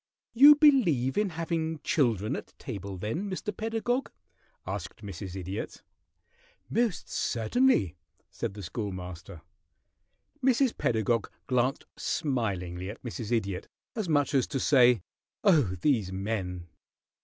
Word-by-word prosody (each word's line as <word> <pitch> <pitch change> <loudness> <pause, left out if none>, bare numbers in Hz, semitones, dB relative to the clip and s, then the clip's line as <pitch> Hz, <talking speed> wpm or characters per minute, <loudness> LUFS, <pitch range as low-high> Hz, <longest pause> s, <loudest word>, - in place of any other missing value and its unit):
"You 285 +5 +9
believe 220 - +4
in 210 -1 +1
having 165 -1 -1
children 120 - +1
at - - -9
table, 100 -5 -6
then, 155 - -3
Mr. 195 +2 -4
Pedagog?" 225 +4 -1 0.6
asked - - -6
Mrs. 95 -1 -7
Idiot. 95 +2 -5 0.9
"Most 230 -6 0
certainly," 115 - +1 0.4
said 95 - -4
the 100 - -7
Schoolmaster. 90 -4 -6 1.0
Mrs. 260 -1 +3
Pedagog 115 -1 0 0.2
glanced 125 +4 0
smilingly 95 - -2
at 105 - -9
Mrs. 115 -2 -5
Idiot, 100 -6 -1 0.3
as 215 -6 -2
much 145 -1 +2
as 135 -3 +3
to 135 - -2
say, 125 - +5 0.4
"Oh, 150 - +4
these 115 -11 +2
men!" 95 -3 -3
120 Hz, 115 wpm, -29 LUFS, -, 1.0 s, You